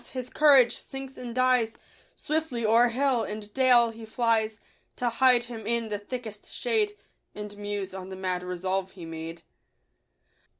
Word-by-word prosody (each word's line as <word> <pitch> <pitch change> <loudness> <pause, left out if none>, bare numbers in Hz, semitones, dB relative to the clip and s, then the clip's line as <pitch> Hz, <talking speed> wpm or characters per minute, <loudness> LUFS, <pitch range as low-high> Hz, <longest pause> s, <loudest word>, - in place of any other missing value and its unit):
his 255 -1 -5
courage 270 -6 +5
sinks 270 0 -8
and 240 -2 -7
dies, 255 -3 +2 0.4
Swiftly 305 -7 -2
o'er 230 +3 +5
hill 255 0 +1
and 210 -1 -6
dale 250 -3 +5
he 225 0 -11
flies, 220 -1 0 0.4
To 245 - 0
hide 245 0 +4
him 230 -3 -7
in 235 -1 0
the 205 -1 -2
thickest 220 -1 -7
shade, 430 -3 0 0.4
And 210 0 -7
muse 205 -2 -4
on 190 0 -7
the 190 - -6
mad 185 -1 -2
resolve 185 +1 -2
he 175 -3 -9
made. 165 +1 -7
230 Hz, 155 wpm, -27 LUFS, 205-255 Hz, 0.4 s, courage